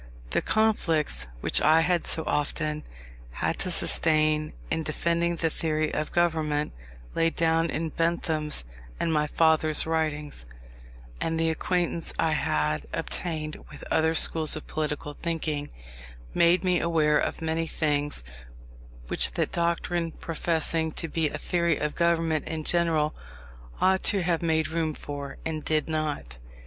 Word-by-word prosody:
The - - +2
conflicts 170 - +1
which - - +1
I 160 +1 +5
had 175 +1 +1
so 160 - +1
often 150 +1 -1 0.5
had - - -1
to - - +2
sustain 155 -1 +2 0.2
in 160 - +1
defending 170 +2 0
the 165 -1 0
theory 155 -1 -1
of 155 - -2
government 155 -4 +1 0.4
laid 165 0 +1
down 165 0 +2
in 160 +1 -2
Bentham's 160 - -1 0.3
and 165 - 0
my 150 -1 +2
father's 155 0 +3
writings, 150 - -2 0.7
and 165 0 0
the 165 0 +2
acquaintance 170 0 -1
I 160 - +2
had 75 - 0
obtained 155 -3 -3
with 145 - -11
other 160 +1 +3
schools 160 -1 +4
of 155 - -7
political 150 -1 -3
thinking, 155 -3 -3 0.6
made 170 +2 +4
me 180 -2 +2
aware 155 -3 +3
of - - -2
many 160 0 -1
things 145 - -1 0.8
which - - +2
that - - -1
doctrine, 170 0 -1
professing 160 -1 -1
to 165 - -3
be 160 -1 0
a - - -5
theory 170 -3 +1
of 150 0 -2
government 165 -3 +1
in 160 -1 -3
general, 160 -3 +2 0.7
ought 190 0 +3
to 195 -3 +4
have 170 -1 +1
made 160 -2 +1
room 160 -2 -1
for, 140 -1 -6
and 155 -2 -3
did 155 -1 +1
not. 150 - -3
160 Hz, 140 wpm, -27 LUFS, 150-165 Hz, 0.8 s, I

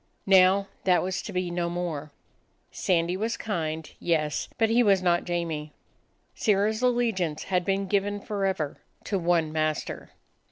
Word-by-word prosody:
Now 195 +1 +5 0.2
that 180 -2 +4
was 185 +1 -2
to - - -7
be 180 -2 -2
no 175 0 -1
more. 165 -4 -4 0.6
Sandy 175 -1 +1
was 225 +4 -2
kind; 160 -6 -3
yes, 155 -3 0
but 225 -2 +2
he 240 +2 +5
was 195 -5 +4
not 175 -1 +2
Jamie. 165 -4 -3 0.6
Sirrah's 215 +1 +1
allegiance 230 -11 +1
had 180 -2 0
been 195 +2 0
given 205 +1 0
forever 195 -8 -2 0.3
to 200 -2 -1
one 170 -2 +1
master. 155 -1 -2
185 Hz, 145 wpm, -27 LUFS, 165-200 Hz, 0.6 s, Now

